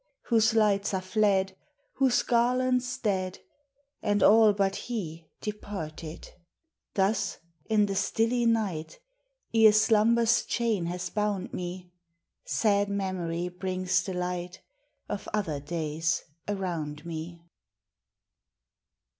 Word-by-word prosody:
Whose 225 -1 +4
lights 205 -2 +2
are 185 - -1
fled, 190 -1 +1 0.4
Whose 265 -2 +3
garlands 250 +1 +1
dead, 190 -5 -1 0.6
And 205 0 +1
all 220 0 +7
but 195 -1 0
he 170 -9 -5
departed. 170 -7 -6 0.7
Tims 200 +3 +1 0.3
in 215 -1 +3
the 200 - -2
stilly 230 +4 +1
night, 205 - -1 0.6
Ere 220 -1 +7
slumber's 225 +2 +4
chain 220 -8 0
has 180 +1 -3
hound 210 -3 -2
me, 180 0 -6 0.5
Sad 205 -2 +2
Memory 180 -4 -2
brings 185 0 -1
the 190 - -5
light 180 0 -4 0.4
Of 205 - -5
other 165 -9 -1
days 160 +1 -2 0.2
around 170 -7 -3
me. 170 +1 -6
195 Hz, 105 wpm, -28 LUFS, 175-220 Hz, 0.7 s, all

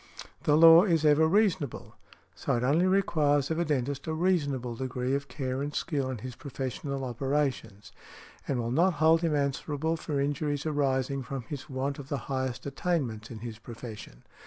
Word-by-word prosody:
The 150 0 +4
law 165 +1 +9
is 165 -6 +2
ever 150 +1 +5
reasonable; 185 - 0 0.4
so - - -1
it 120 - -1
only 155 +8 +3
requires 150 -7 +2
of 160 - 0
a 170 - +1
dentist 140 -2 -2
a 160 - -1
reasonable 145 -8 0
degree 125 +1 -2
of 140 0 -1
care 130 0 -3
and 145 +1 -4
skill 140 -6 -1
in 130 - -3
his 125 +3 -7
professional 135 +1 -5
operations, 125 -6 -2 0.6
and 135 - 0
will 120 -1 -2
not 175 +8 +3
hold 160 +1 +4
him 165 -3 +1
answerable 145 +3 -1
for 150 -2 -3
injuries 145 +1 -1
arising 140 -2 0
from 130 0 -5
his 140 +3 -7
want 135 +1 -3
of 135 -1 -9
the 140 - -1 0.2
highest 130 -2 -2
attainments 135 -7 -2
in 110 -3 -8
his 115 -2 -7
profession. 115 - -10
140 Hz, 175 wpm, -29 LUFS, 130-155 Hz, 0.6 s, law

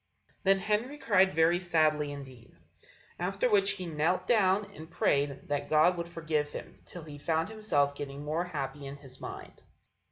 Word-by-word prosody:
Then 195 0 +4
Henry 215 +8 -1
cried 190 -8 +4
very 165 +1 +3
sadly 155 -4 +2
indeed. 130 -4 -11 0.6
After 195 +6 0
which 200 -1 +4
he 185 -2 -6
knelt 170 +3 0
down 205 -2 +3
and 160 +1 -10
prayed 140 -3 0
that 145 -1 -2
God 155 +4 +5
would 170 0 -5
forgive 155 -3 -1
him, - - -9
till 175 - -8
he 150 -2 -10
found 160 +4 0
himself 180 -11 +1
getting 140 0 -6
more 160 +4 -1
happy 145 -4 -5
in 140 - -7
his 135 -2 -14
mind. - - -8
160 Hz, 165 wpm, -30 LUFS, 145-190 Hz, 0.6 s, God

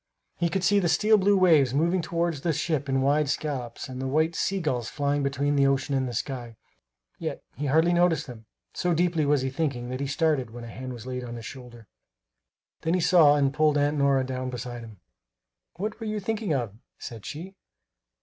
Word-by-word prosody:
He 170 0 +1
could 185 +2 -1
see 205 +1 +4
the 175 -3 +1
steel 215 +6 +4
blue 200 0 +4
waves 155 -8 +4
moving 170 +5 +2
toward 170 0 -1
the 160 +4 -1
ship 150 -1 -1
in 135 0 +1
wide 145 +1 +2
scallops 140 -5 -3
and 130 -1 -6
the 135 - -2
white 155 +4 +1
sea 195 +3 -1
gulls 125 -9 -2
flying 145 0 0
between 140 +1 0
the 140 -1 +4
ocean 135 +1 0
and 135 -1 +1
the 120 - -5
sky. 120 -2 -4 0.6
Yet - - -4
he 145 +4 -3
hardly 160 +5 +3
noticed 175 -3 +2
them; 115 -4 -11 0.3
so 175 -1 0
deeply 170 -3 +1
was 145 -2 +2
he 130 - -2
thinking 135 -5 -2
that 130 +1 -4
he 140 - -2
started 145 -4 +1
when 120 +1 -9
a 115 - -8
hand 130 +1 -6
was 120 -1 -9
laid 125 -1 -4
on 120 -1 -6
his 115 -1 -8
shoulder. 120 -3 -10 1.0
Then 165 +2 +1
he - - +1
saw 160 -4 +6
and 140 -2 +2
pulled 150 0 +3
Aunt 145 +1 +2
Nora 140 -1 +3
down 130 0 -4
beside 120 -1 -6
him. 110 -4 -12 0.8
"What 210 +5 -4
were 225 - -5
you 215 0 -2
thinking 215 -1 -2
of?" 120 -8 -1 0.2
said 115 -3 -8
she. 175 +6 -7
145 Hz, 210 wpm, -26 LUFS, 130-170 Hz, 1.0 s, saw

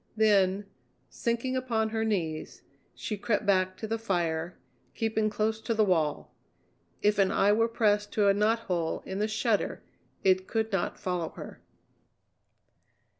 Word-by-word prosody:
Then, 200 -2 +3 0.5
sinking 235 +2 -1
upon 230 -4 0
her 220 0 -1
knees, 170 -8 -2 0.3
she 210 -2 -4
crept 210 0 0
back 185 -2 +2
to - - -5
the 225 +1 -2
fire, 175 -5 -1 0.4
keeping 220 -1 0
close 220 +1 -1
to 230 - -1
the 215 - +4
wall. 160 -7 0 0.7
If 210 0 +3
an 195 -1 +4
eye 200 - +3
were 225 +2 +3
pressed 210 -3 +1
to 210 -2 +3
a 200 - +6
knothole 205 -6 0
in 190 - -4
the 210 - +1
shutter 215 0 0 0.4
it 185 0 +3
could 220 -1 -1
not 195 -3 -1
follow 175 -3 -2
her. - - -9
210 Hz, 145 wpm, -29 LUFS, 185-220 Hz, 0.7 s, a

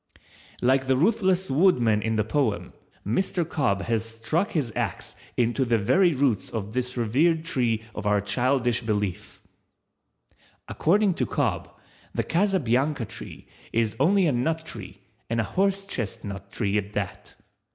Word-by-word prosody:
Like 130 +1 +3
the 130 -1 +3
ruthless 190 - +2
Woodman 125 - +3
in 110 0 -1
the 105 - +2
poem, 115 -2 -1 0.3
Mr. 170 - 0
Cobb 125 -12 0
has 115 -2 0
struck 115 - -2
his 130 -9 -1
axe - - -3 0.2
into 120 +2 +2
the 120 -2 +2
very 170 - +3
roots 130 -6 +1
of 105 -2 -5
this 125 0 -2
revered 155 +9 +2
tree 120 -9 0
of 105 -1 -4
our 105 0 +3
childish 120 +4 +1
belief⸺ 105 -5 -3 1.3
According 200 +4 +2
to - - -1
Cobb, - - -1 0.5
the - - +1
Casabianca 150 - +1
tree - - -9 0.3
is 115 -2 +1
only 190 +6 +4
a 155 - +3
nut 160 +6 -1
tree 100 - -8 0.3
and 115 0 0
a - - +2
horsechestnut 115 - -2
tree 100 0 0
at 105 +1 -7
that. 100 -3 -5
125 Hz, 140 wpm, -25 LUFS, 110-160 Hz, 1.3 s, only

